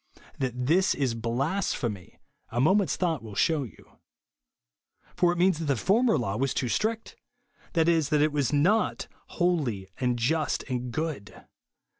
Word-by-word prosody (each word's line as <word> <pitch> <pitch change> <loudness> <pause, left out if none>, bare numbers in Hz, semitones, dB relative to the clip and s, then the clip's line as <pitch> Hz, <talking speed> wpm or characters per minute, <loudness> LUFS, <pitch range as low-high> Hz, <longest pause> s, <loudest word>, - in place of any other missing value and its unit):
That 125 -2 -2
this 180 +7 +3
is 135 -4 0
blasphemy, 120 - -2 0.3
a 120 - -3
moment's 190 +8 +3
thought 165 -6 -1
will 110 -3 -10
shew 155 +6 +2
you. 115 - -17 1.2
For 175 -1 +3
it 175 - -3
means 180 -2 +3
that 165 - -3
the 140 -2 +1
former 215 - +2
law 105 -6 -2
was 135 +1 -1
too 125 - -1
strict; 220 - -2 0.6
that 165 -1 +2
is, 165 -3 +2
it 150 0 +3
was 145 -2 0
not 180 +10 +1
" - - -36
holy, 140 - 0
and 125 -2 0
just, 145 +5 0
and 125 -1 -4
good." 155 -7 -5
145 Hz, 155 wpm, -27 LUFS, 125-175 Hz, 1.2 s, this